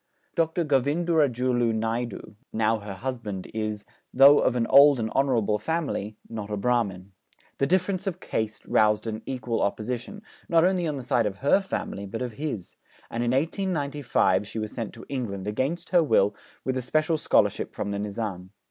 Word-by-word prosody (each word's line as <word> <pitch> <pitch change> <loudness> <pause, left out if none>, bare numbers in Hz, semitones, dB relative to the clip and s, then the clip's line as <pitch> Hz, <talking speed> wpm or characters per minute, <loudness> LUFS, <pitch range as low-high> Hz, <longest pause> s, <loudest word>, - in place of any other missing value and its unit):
Dr. 165 0 0
Govindurajulu 135 -5 +2
Naidu, 115 0 -3 0.2
now 110 0 +1
her 100 -1 -7
husband, 110 -5 -5
is, 110 -1 -3 0.3
though 140 +3 +7
of - - +2
an 120 -2 +1
old 140 0 +7
and 110 -1 -2
honourable 115 -6 +1
family, 110 -7 -2
not 110 -3 -6
a 105 - -2
Brahmin. 100 -5 -1 0.5
The 140 - +2
difference 185 +3 0
of 185 -2 -2
caste 110 -8 -3
roused 105 0 +3
an 110 -1 -4
equal 125 -3 -2
opposition, 120 - -3 0.3
not 165 -1 +5
only 180 -2 +1
on 150 -2 -2
the 130 - -6
side 120 -2 +2
of 100 -1 -5
her 195 - +5
family, 100 - -4
but 115 +5 -4
of 125 - -4
his; 115 - -5 0.4
and 115 +1 -1
in 120 - 0
1895 140 - 0
she 110 - -7
was 110 -1 -3
sent 115 -4 -4
to - - -11
England, 105 -8 -4
against 135 +11 -2
her 175 -2 +6
will, 105 -10 +3 0.3
with 130 - 0
a - - -1
special 155 +5 +1
scholarship - - +2
from 100 - -3
the 100 - -2
Nizam. 100 -3 -4
120 Hz, 175 wpm, -26 LUFS, 105-145 Hz, 0.5 s, though